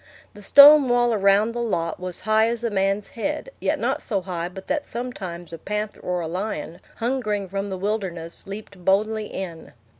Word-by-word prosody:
The 205 - -13
stone 285 +5 +8
wall 240 -1 +3
around 200 +2 +3
the 240 +1 -4
lot 170 -8 -2
was 180 -1 -4
high 215 +2 +3
as 235 0 -2
a 235 - -1
man's 195 +1 0
head, 295 - -4
yet - - 0
not - - -1
so 200 -6 -2
high 175 -2 -4
but 190 +1 -10
that 295 -1 -1
sometimes 185 -9 -6
a 165 - -7
panther 210 +4 -4
or 180 -1 -2
a 165 - -3
lion, 175 -2 -4 0.2
hungering 225 -5 -1
from 195 +2 -4
the 190 - -4
wilderness, 185 -5 -3
leaped 200 -2 -9
boldly 210 +3 +1
in. 170 -4 -7
200 Hz, 185 wpm, -23 LUFS, 180-225 Hz, 0.2 s, stone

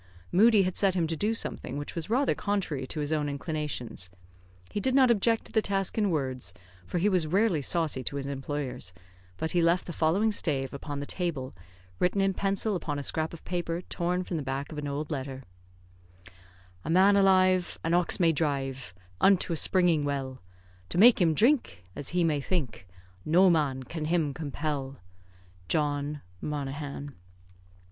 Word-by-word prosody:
Moodie 215 +1 +5
had 185 -1 -2
set 195 -2 +2
him 175 -3 +2
to 165 0 -2
do 210 +7 0
something 225 - -3
which 145 - -6
was 165 +1 -4
rather 265 +5 +2
contrary 180 -10 -2
to 150 - -3
his 145 +1 -1
own 150 -2 0
inclinations; 140 - -4 0.6
he - - -2
did 260 +5 +1
not 260 -3 +6
object 225 +1 +2
to - - -9
the 220 - +3
task 195 -2 0
in 210 -3 +2
words, 130 - -2 0.3
for - - -2
he 180 +4 +2
was 180 -6 +2
rarely 190 -2 +2
saucy 155 -3 0
to 140 - -2
his 140 -1 -3
employers, 135 -7 -4 0.4
but 160 - -2
he 175 - +2
left 170 +2 +2
the 175 - -6
following 185 +9 +2
stave 140 -9 -1
upon 140 +1 -5
the 145 - -4
table, 155 -7 -3 0.5
written 180 +2 +1
in 195 0 +2
pencil 195 +2 0
upon 150 -5 -3
a 145 - -4
scrap 160 +3 -1
of 170 - -11
paper 175 -1 -3
torn 180 +2 -1
from 175 -2 -4
the - - -2
back 135 +2 -4
of 150 - -5
an 145 - -4
old 145 +2 -4
letter: 135 -2 -4 1.4
"A - - -6
man 190 +4 +5
alive, 185 -2 +3
an 165 - 0
ox 175 +2 +3
may 170 -2 +5
drive 135 - -2 0.2
Unto 190 -3 +4
a - - 0
springing 170 -2 +3
well; 135 -2 -3 0.5
To - - -3
make 230 +2 +7
him 165 -3 +3
drink, 235 - +2
as 140 - -2
he 175 0 +1
may 150 -3 +1
think, 135 - -3 0.4
No 180 +4 +5
man 140 -5 0
can 155 +3 -5
him 160 -3 +1
compel. 145 -2 -4 0.7
"JOHN 145 - -1 0.2
MONAGHAN." 145 -1 -5
160 Hz, 180 wpm, -28 LUFS, 140-185 Hz, 1.4 s, make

